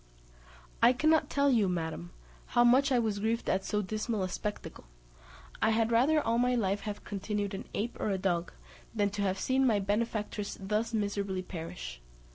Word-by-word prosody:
I 245 - +7
cannot 310 +5 +3
tell 280 0 +3
you, 215 -6 +3
madam, 160 - -3 0.5
how 240 - +7
much 260 +4 +5
I 255 - +4
was 220 -4 0
grieved 225 +3 -1
at 190 +1 +1
so 210 +1 -1
dismal 215 +1 -2
a 185 - -2
spectacle; 210 +3 -5 0.8
I - - +4
had 225 +1 +2
rather 270 +7 +4
all 230 -5 +1
my 250 0 +2
life 200 -3 0
have 205 - -6
continued 205 0 -3
an 195 - -6
ape 230 +4 -3
or - - -1
a 195 - 0
dog, 175 -2 -1 0.4
than 205 -2 +1
to 205 0 -3
have 190 -1 0
seen 265 +6 +1
my 220 -4 +3
benefactress 210 0 -2
thus 210 +4 -1
miserably 200 -3 -1
perish. 60 - -7
210 Hz, 180 wpm, -30 LUFS, 195-235 Hz, 0.8 s, I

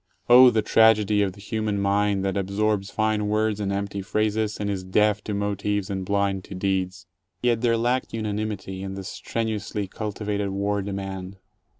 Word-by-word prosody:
Oh, 125 +1 +9
the 110 -3 +1
tragedy 105 -2 +4
of 95 -2 0
the 100 - -16
human 105 -1 -2
mind 100 0 +1
that 95 - -1
absorbs 100 +1 0
fine 110 -1 0
words 105 0 +1
and 100 -1 -1
empty 100 0 -3
phrases, 110 +2 0
and 105 - -2
is 100 -2 -2
deaf 105 +2 +2
to 105 - -2
motives 100 0 -1
and 95 -1 -2
blind 100 -1 0
to 95 - -8
deeds! 95 0 -2 0.4
Yet 120 -2 +2
there 115 -2 +2
lacked 120 +3 0
unanimity 105 -3 -3
in 95 0 -5
the 95 - -6
strenuously 105 0 -3
cultivated 105 0 -3
war 100 +1 -1
demand. 95 -1 -5
100 Hz, 170 wpm, -25 LUFS, 100-110 Hz, 0.4 s, Oh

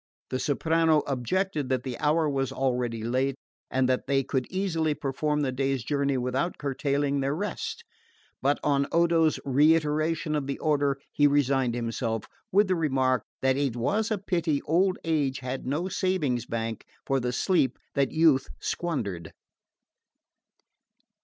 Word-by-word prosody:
The 130 - -1
soprano 160 +2 +2
objected 145 +3 -1
that 130 -1 0
the 130 -2 -4
hour 155 +1 +2
was 135 -2 -1
already 125 -4 -1
late, 130 +3 0 0.3
and 130 -1 +1
that 130 +1 0
they 135 0 +2
could 130 -1 -2
easily 165 -5 0
perform 150 +1 -1
the 135 -3 0
day's 135 -1 -1
journey 140 -1 0
without 130 +7 -1
curtailing 140 0 0
their 135 +1 0
rest; 205 +3 -4 0.6
but 140 +2 +2
on 140 -1 +2
Odo's 165 -2 +3
reiteration 155 +2 +2
of 145 -3 -1
the 140 - -2
order 145 -3 +1
he 145 - +4
resigned 135 -4 +2
himself, 115 -1 -2 0.3
with 205 +2 +4
the 185 - +2
remark 130 -5 +1 0.2
that 130 0 +3
it 140 -4 0
was 200 - 0
a 215 - 0
pity 170 -6 0
old 185 +4 +2
age 145 -5 0
had 130 0 -4
no 150 +7 -1
savings 155 - 0
bank 115 -1 -3 0.2
for 135 0 +1
the 125 -1 -1
sleep 135 -2 +1 0.2
that 140 -1 +1
youth 155 -5 +4
squandered. 105 - -3
140 Hz, 145 wpm, -27 LUFS, 130-160 Hz, 0.6 s, he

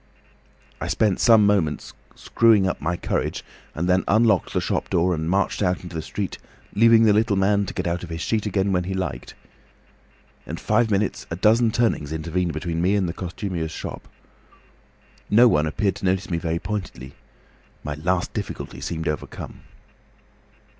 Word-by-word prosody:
"I - - -2
spent 105 -4 +1
some 110 -3 +6
minutes 90 -8 0 0.2
screwing 110 -4 +3
up 90 - -3
my 90 - -1
courage - - -2 0.3
and 85 +3 -1
then 95 +1 +3
unlocked 110 -3 +3
the - - +1
shop - - -2
door 90 +1 +2
and 80 0 -2
marched 95 +3 0
out 90 -2 0
into 90 -1 -9
the 80 - -2
street, 95 +4 -5 0.3
leaving 115 +2 +6
the 110 -2 +5
little 110 0 +2
man 100 +1 +2
to - - -5
get - - -2
out 85 +1 -1
of 85 - -8
his 80 0 -5
sheet 110 +2 -1
again 100 0 0
when 90 -1 0
he 95 +1 -3
liked. 90 -10 -4 1.1
In - - -5
five 115 -1 +1
minutes 100 -1 -1
a 85 - -3
dozen 110 +5 +3
turnings 110 -10 0
intervened 85 +2 -2
between 80 +1 -3
me 95 +4 +2
and 95 -3 +1
the 85 - -3
costumier's 90 -2 -4
shop. - - -7 1.2
No 120 +4 +6
one 75 -8 +2
appeared 95 +4 -1
to - - -6
notice 95 0 0
me 85 - 0
very 85 0 -2
pointedly. 85 -10 -5 0.7
My 75 - -3
last 90 +5 -1
difficulty - - -6
seemed 80 0 -4
overcome." 75 -2 -5
95 Hz, 175 wpm, -23 LUFS, 85-105 Hz, 1.2 s, some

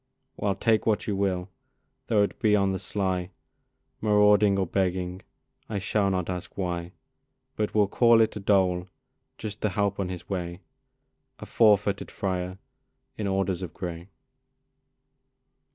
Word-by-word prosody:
Well, 100 -1 -1
take 110 -1 +1
what 105 -2 +1
you 105 - -1
will, 95 -2 -1 0.6
though 105 -3 +3
it 100 - -3
be 105 -3 +4
on 100 -1 +2
the 95 - -2
sly, 95 -3 -2 0.7
Marauding 105 -1 +4
or 95 - +1
begging, 90 0 -1 0.5
I 105 - -2
shall 100 0 +1
not 90 -2 -1
ask 90 -1 -6
why, 85 -2 -3 0.6
But 105 0 -2
will 105 -2 +4
call 115 +2 +5
it 110 - +2
a - - -4
dole, 95 -3 +2 0.5
just 105 -2 -7
to 105 - +1
help 100 0 -1
on 95 -2 -1
his 90 -1 -7
way 90 -2 -4 0.8
A - - -9
four 105 -3 +5
footed 100 0 -3
friar 95 -1 -3 0.6
in 105 - -3
orders 95 -2 0
of 90 -4 -6
gray! 85 0 -6
95 Hz, 150 wpm, -27 LUFS, 90-105 Hz, 0.8 s, call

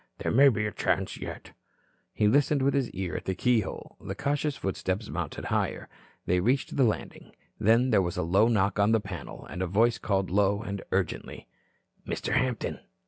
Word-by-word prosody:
"There - - -2
may 140 +4 +7
be 105 -4 -1
a 105 - -2
chance - - -1
yet." - - -8 0.6
He 105 - +2
listened 140 +4 +3
with 140 - +3
his 135 -4 +1
ear 95 -2 -4
at - - -5
the 95 - -1
keyhole. 115 -1 -1
The - - -5
cautious 145 0 -1
footsteps 95 +2 -3
mounted 80 0 -4
higher. - - -1 0.4
They 90 +1 +2
reached 125 +8 0
the 135 - +4
landing. 110 -4 -2 0.2
Then 115 +4 +4
there 105 - +5
was 90 -1 -3
a - - 0
low 95 +7 +4
knock 105 -3 +1
on 105 +2 +4
the 115 - +4
panel, 95 -7 -8
and 90 - -6
a 95 - 0
voice 115 +6 +2
called 95 -3 -1
low 100 +2 +2
and 100 -3 -4
urgently: 95 -9 -2 0.6
"Mr. - - -2
Hampton. 125 -4 0
105 Hz, 190 wpm, -28 LUFS, 95-125 Hz, 0.6 s, may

